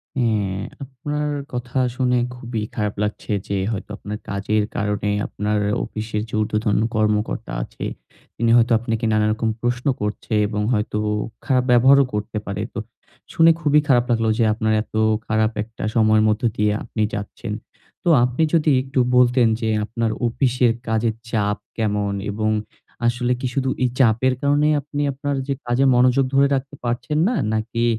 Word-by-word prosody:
হ্যা, 125 - +1 0.6
আপনার 145 +3 -4 0.3
কথা 125 +1 -4 0.2
শুনে 125 -1 +2 0.2
খুবই 120 -3 -4
খারাপ 105 -2 -1
লাগছে 105 +1 -4 0.2
যে 100 - -1
হয়তো 105 -1 -5
আপনার 105 +1 -6
কাজের 105 +2 0
কারণে 105 -1 -1 0.2
আপনার 105 0 -1 0.2
অফিসের 110 -1 -4
যে - - -16
উর্দ্ধতন 105 0 0 0.2
কর্মকর্তা 105 - 0
আছে, - - -7 0.5
তিনি 115 0 +1
হয়তো 120 +1 +3
আপনাকে 115 -1 -2
নানা 105 0 +3
রকম 110 0 -1
প্রশ্ন 120 +1 -1 0.2
করছে 105 +2 -3
এবং 105 0 -2
হয়তো 105 0 -1 0.5
খারাপ 130 -2 +2
ব্যবহারও 135 +3 +6
করতে 105 +1 -3
পারে। 100 0 -4
তো - - -3 0.5
শুনে 165 0 +6
খুবই 150 0 +4
খারাপ 125 -3 +4
লাগলো 115 -1 +2
যে - - +4
আপনার 110 0 0
এত 110 - -10 0.3
খারাপ 110 0 +2
একটা 115 +1 -10
সময় 110 -1 +4
মধ্যে 110 +3 +1
দিয়ে 105 0 +2
আপনি 115 -1 -4
যাচ্ছেন। 105 +1 -5 0.5
তো 175 - +1
আপনি 125 +6 +1
যদি 160 -2 +3
একটু 135 0 -2 0.2
বলতেন 125 -1 +5
যে 110 - 0 0.2
আপনার 115 0 -1 0.2
অফিসের 125 -1 +2
কাজের 110 0 +1 0.2
চাপ 105 -2 0 0.2
কেমন? 105 -2 0 0.2
এবং 110 +1 0 0.6
আসলে 120 +1 0
কি 130 - -2
শুধু 130 0 0
এই 125 - +3
চাপের 125 +1 +4
কারণেই 145 +2 +3
আপনি 145 +1 -4
আপনার 140 +1 -3
যে 140 - +1
কাজে 120 +3 +2
মনোযোগ 125 +2 +4
ধরে 140 +1 +5
রাখতে 140 +2 -4
পারছেন 120 +5 -2
না? 250 - 0 0.2
নাকি 115 +2 -1
115 Hz, 160 wpm, -21 LUFS, 105-130 Hz, 0.6 s, ব্যবহারও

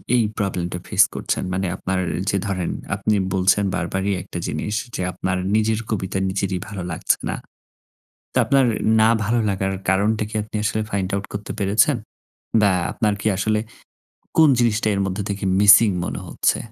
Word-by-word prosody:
এই 120 - +4
প্রবলেম 95 -4 -1
টা 90 - -4
ফেস 100 -1 +5
করছেন? - - -2
মানে 95 0 -1
আপনার 95 0 -2 0.3
যে 100 - +1
ধরেন 90 -4 -2 0.2
আপনি 100 +2 0 0.2
বলছেন 95 +1 +3
বারবারই 95 +4 -1
একটা 90 - -7
জিনিস 105 - -3 0.2
যে - - -3
আপনার 95 +1 -2 0.2
নিজের 110 0 +2
কবিতা 95 -3 -2
নিজেরই 95 -1 -2
ভালো 100 -4 -6
লাগছে 80 - +1
না। - - -1 1.0
তো - - -1
আপনার 135 -1 +3 0.4
না 110 - +5
ভালো 120 +4 +1
লাগার 95 0 -1 0.2
কারণটা 105 +3 +2
কি 110 - -8
আপনি 110 - -10
আসলে 110 0 0
find 95 -2 -1
out 100 0 -3
করতে 100 0 -5
পেরেছেন? 105 +7 +3 0.6
বা 105 -1 +4 0.2
আপনার 105 -2 0
কি - - -5
আসলে 105 +2 +1 0.8
কোন 160 -2 +7
জিনিসটা 115 -2 +2
এর 100 - -1
মধ্যে 95 +2 -3
থেকে 100 0 -3 0.2
মিসিং 105 +2 +8
মনে - - -4
হচ্ছে? - - +1
100 Hz, 170 wpm, -21 LUFS, 95-110 Hz, 1.0 s, মিসিং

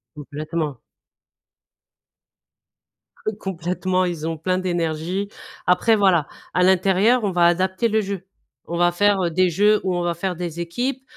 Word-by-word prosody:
Complètement. 150 -1 -4 2.5
Eux - - +1
complètement 185 0 -1
ils 170 -3 -3
ont 165 -1 -4
plein 185 +3 0
d'énergie. 175 +1 -2 0.4
Après 220 +5 +4
voilà, 185 -7 +3 0.3
à 180 - +3
l'intérieur 195 +6 +3
on 195 - 0
va 175 -1 +4
adapter 185 +5 +1
le 220 0 +2
jeu. 195 -2 -5 0.5
On - - -1
va 175 0 +3
faire, 205 +2 +3
heu, 170 - 0
des 185 +2 +2
jeux 205 +5 +3
où 185 -1 0
on 175 - -1
va 175 0 0
faire 180 +1 -3
des 170 -1 -5
équipes, 245 +10 -3
180 Hz, 150 wpm, -22 LUFS, 170-195 Hz, 2.5 s, Après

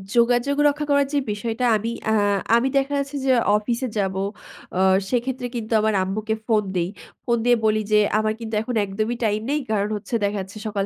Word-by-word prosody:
যোগাযোগ 240 +4 +3
রক্ষা 295 +1 0
করার 280 -1 +3
যে - - +2
বিষয়টা 225 +4 -2
আমি 225 +3 -3 0.2
আ - - +3 0.4
আমি 235 +3 +3
দেখা 275 +1 0
যাচ্ছে 280 +1 -4
যে 265 - +4 0.3
অফিসে 235 +4 -2
যাবো 190 -1 0 0.6
আ - - +1 0.3
সেক্ষেত্রে 250 +1 -1
কিন্তু 230 -1 -3
আমার 220 0 +1
আম্মুকে 215 +3 -2
ফোন 220 -3 +3
দেই। 175 0 0 0.4
ফোন 235 -1 +2
দিয়ে 245 0 +5
বলি 215 0 +2
যে 210 - +6 0.2
আমার 215 0 0
কিন্তু 225 -1 -7
এখন 240 +2 -4
একদমই 215 +4 -2
টাইম 210 0 +1
নেই 295 +1 +1
কারণ 205 -1 +1
হচ্ছে 210 +3 -4
দেখা 205 +1 0
যাচ্ছে 190 +3 -10
সকাল 200 -2 -1
225 Hz, 195 wpm, -23 LUFS, 210-250 Hz, 0.6 s, যে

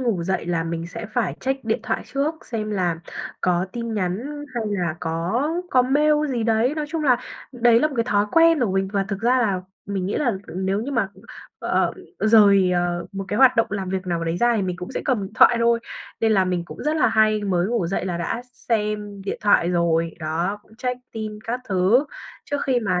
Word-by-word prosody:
ngủ 230 -9 0
dậy 190 -1 -2
là 165 -2 0
mình 165 0 -3
sẽ 220 +5 -7
phải 245 - 0
check 265 -1 -2
điện 220 0 0
thoại 225 -2 -2
trước 285 +4 -1
xem 215 -2 -3
là 175 -5 -1 0.4
có 180 +1 +1
tin 235 -1 -4
nhắn 220 +10 -3
hay 235 -2 -1
là 180 -6 -1
có 165 +7 -1 0.3
có 255 - +5
mail 290 +4 +3 0.2
gì 240 -3 -1
đấy. 230 +5 +2
Nói 305 -1 -3
chung 320 -1 -2
là, 250 -4 +5 0.4
đấy 235 -1 +4
là 305 - +3
một 285 - -8
cái 230 - +2
thói 205 -2 +2
quen 330 -3 +5
của 225 -6 +1
mình 195 0 0
và 195 -1 +1
thực 200 -1 -3
ra 250 +3 +3
là 200 -6 +1 0.3
mình 195 -2 -2
nghĩ 200 - -2
là 260 -6 +1 0.2
nếu 190 +2 -1
như 250 +6 -4
mà, 225 -6 +1
ừm, - - -18 0.4
ờ, - - +1 0.3
rời, 200 -4 +5
ờ, 175 -1 -1
một 195 0 -4
cái 205 - -1
hoạt 255 0 +6
động 230 - +4
làm 195 -2 -3
việc 190 0 -3
nào 170 -1 -1
đấy 165 +1 -1
ra 240 +4 +3
thì 205 - 0
mình 180 -2 -2
cũng 180 0 -7
sẽ - - -2
cầm 255 -7 +1
điện 195 - -7
thoại 235 - +6
thôi, 235 0 +3 0.4
nên 225 -1 +3
là 190 -3 +4
mình 180 -2 -1
cũng - - -9
rất 305 +1 0
là 305 - +4
hay 215 -1 +3
mới 180 -2 +1
ngủ 225 -6 0
dậy 190 +1 -2
là 180 -2 -2
đã 200 +8 -2
x - - -27 0.2
xem 210 -3 -1
điện 195 - -4
thoại 205 -4 +4
rồi, 165 -1 +1
đó, 170 +5 -2
cũng 220 - -22
check 250 0 -2
tin 215 -1 -5
các 245 +2 -2
thứ 195 +8 +3 0.4
trước 285 - -2
khi 250 -2 +2
mà 185 -4 0
210 Hz, 235 wpm, -23 LUFS, 185-240 Hz, 0.4 s, hoạt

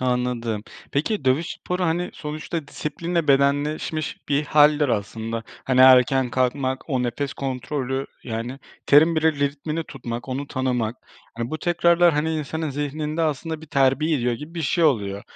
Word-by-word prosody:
Anladım. 125 -3 -1 0.3
Peki 150 +3 -1
dövüş 135 +6 +2
sporu, 180 0 -3
hani, 175 +2 0
sonuçta 150 0 -5
disiplinle 165 +1 -3
bedenleşmiş 145 +3 0
bir 145 +1 +1
hâldir 150 0 +4
aslında. 115 +1 -2 0.2
Hani, 130 -1 +2
erken 130 0 +6
kalkmak, 130 +2 -1
o 130 -2 +1
nefes 130 +3 -2
kontrolü, 135 0 -3 0.2
yani, 120 +3 -4 0.3
terin 160 +3 +6
bile 160 0 +3
ritmini 145 +3 -2
tutmak, 120 -2 -7
onu 140 +2 -3
tanımak, 125 -4 -1 0.4
hani, 115 +1 -4
bu 155 - -3
tekrarlar, 170 0 +3
hani, 155 +2 0
insanın 155 0 -3
zihninde 150 +3 -2
aslında 160 +1 -2
bir 160 - -11
terbiye 140 +2 +2
ediyor 125 -2 0
gibi 150 +7 -9
bir 165 - -3
şey 165 +4 +1
oluyor. 100 -8 +1
140 Hz, 150 wpm, -23 LUFS, 125-155 Hz, 0.4 s, erken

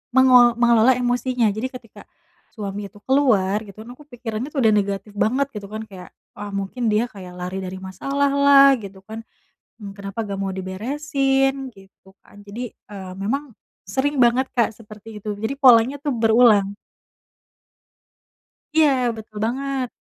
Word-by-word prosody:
mengelo 250 -2 +6
mengelola 235 +1 +5
emosinya, 245 -1 0
jadi 220 +5 -3
ketika 240 -4 -12 0.5
suami 205 -2 -5
itu 205 - -18
keluar 220 -8 +2
gitu 200 - -14
kan, 230 - -13
aku - - -13
pikirannya 240 -2 -5
udah 250 -7 +3
negatif 200 0 -1
banget 260 +7 +1
gitu 205 -1 -6
kan, 215 +2 -6
kayak, 185 -2 -11 0.3
"Ah 205 0 -7
mungkin 200 +5 -3
dia 215 +3 +2
kayak 185 -5 -11
lari 180 +1 -5
dari 185 0 -6
masalahlah," 275 +6 +4
gitu 195 -1 -11
kan, 220 +2 -8 0.6
mmm, 200 -2 -8
"kenapa 200 +2 -6
nggak 200 -2 -5
mau 195 -1 -2
diberesin?" 270 +7 -1
Gitu 195 -1 -20
kan, 205 - -17
jadi, 235 +5 -6
eee, 190 -3 -11
memang 270 +7 -3 0.4
sering 270 +6 -1
banget 245 +2 +3
Kak 235 -2 +2
seperti 215 0 -12
itu, 210 0 -4
jadi 220 +6 -3
polanya 255 -1 +5
tuh 290 -1 -2
berulang. 220 -3 +4 2.0
Iya, 310 -2 +6 0.3
betul 215 -1 -11
banget. 265 +2 -2
225 Hz, 145 wpm, -21 LUFS, 200-260 Hz, 2.0 s, mengelo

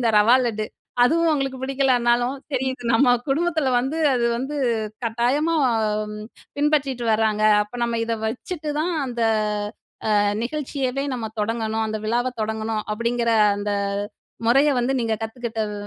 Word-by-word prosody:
இந்த 230 -2 +2
ரவா 230 +5 +6
லட்டு 215 -2 -2 0.4
அதுவும் 330 +5 +3
உங்களுக்கு 270 -2 -1
பிடிக்கலைன்னாலும் 255 -1 +2 0.2
தெரியுது 260 -1 -2
நம்ம 245 +3 +4 0.2
குடும்பத்தில 315 -1 +1
வந்து 270 +6 -2 0.2
அது 240 -1 +1
வந்து 270 +4 -4 0.5
கட்டாயமா 250 +8 +1 1.0
பின்பற்றிட்டு 285 -4 +1
வராங்க. 215 -1 +1 0.2
அப்ப 210 +3 -12
நம்ம 235 -1 -1
இத 230 - 0
வச்சுட்டு 300 +7 -4
தான் 350 +3 0
அந்த 240 -2 -5 1.0
அ - - +5 0.3
நிகழ்ச்சியவே 275 -1 -2
நம்ம 225 -3 -4
தொடங்கணும். 220 0 -1
அந்த 215 0 -3
விழாவ 245 +3 0
தொடங்கணும் 220 0 -2
அப்படிங்கிற 235 +1 0 0.3
அந்த 205 0 -2 0.7
முறைய 275 +5 +5
வந்து 245 +2 +1
நீங்க 225 -1 0
கத்துக்கிட்ட 225 0 -5
அ 210 - -6
245 Hz, 130 wpm, -23 LUFS, 225-275 Hz, 1.0 s, ரவா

